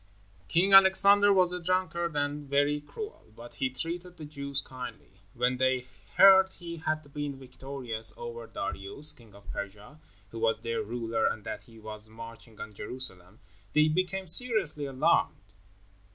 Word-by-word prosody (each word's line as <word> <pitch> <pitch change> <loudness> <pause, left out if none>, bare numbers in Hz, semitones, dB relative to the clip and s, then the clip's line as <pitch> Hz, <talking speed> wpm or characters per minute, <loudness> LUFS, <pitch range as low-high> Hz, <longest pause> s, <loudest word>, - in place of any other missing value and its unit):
King 185 - +2
Alexander 200 +1 +7
was 185 -2 +4
a 180 - -4
drunkard 170 -2 -1
and 145 0 -3
very 145 +1 +1
cruel, 420 - -10
but 120 +1 -12
he 130 - +1
treated 175 +6 -4
the 155 - -8
Jews 140 -1 -4
kindly. 125 -8 -10
When 125 +1 0
they 130 -1 +1 0.3
heard 190 -1 +7
he 170 -1 -9
had 155 -2 -4
been 145 -2 -4
victorious 125 -3 -3
over 120 -1 -8
Darius, 140 +10 -1
king 110 -4 -18
of 100 - -11
Persia, 105 +8 -8 0.3
who 115 - -7
was 115 0 +1
their 115 0 -3
ruler, 115 0 -2
and 110 - -3
that - - -7
he 115 -1 -17
was 110 0 -10
marching 115 0 -11
on 105 - -8
Jerusalem, 105 -4 -7 0.3
they 150 +1 +4
became 185 +3 -1
seriously 185 - +5
alarmed. 130 -6 0
140 Hz, 150 wpm, -28 LUFS, 115-170 Hz, 0.3 s, Alexander